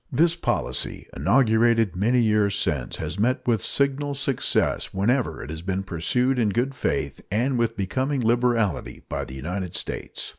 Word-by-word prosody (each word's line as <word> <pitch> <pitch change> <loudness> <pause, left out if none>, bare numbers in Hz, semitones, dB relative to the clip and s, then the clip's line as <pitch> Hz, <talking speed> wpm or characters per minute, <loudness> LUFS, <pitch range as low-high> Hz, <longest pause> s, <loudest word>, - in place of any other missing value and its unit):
This 165 +5 +3
policy, 170 - -2
inaugurated 115 - +3
many 120 +6 +2
years 105 -2 +2
since, 75 -9 -1
has 100 - -4
met 125 +4 +1
with 115 -5 +2
signal 140 +1 0
success 135 -7 0
whenever 120 +7 0
it 70 - -7
has 80 0 -6
been 95 +2 -2
pursued 125 +9 0
in 110 -3 +2
good 125 +7 0
faith - - -2
and 120 +7 +1
with 115 -1 0
becoming 130 +8 -1
liberality 115 - +1
by - - -3
the 65 - -9
United 90 +6 -4
States. - - -5
115 Hz, 155 wpm, -24 LUFS, 95-130 Hz, -, This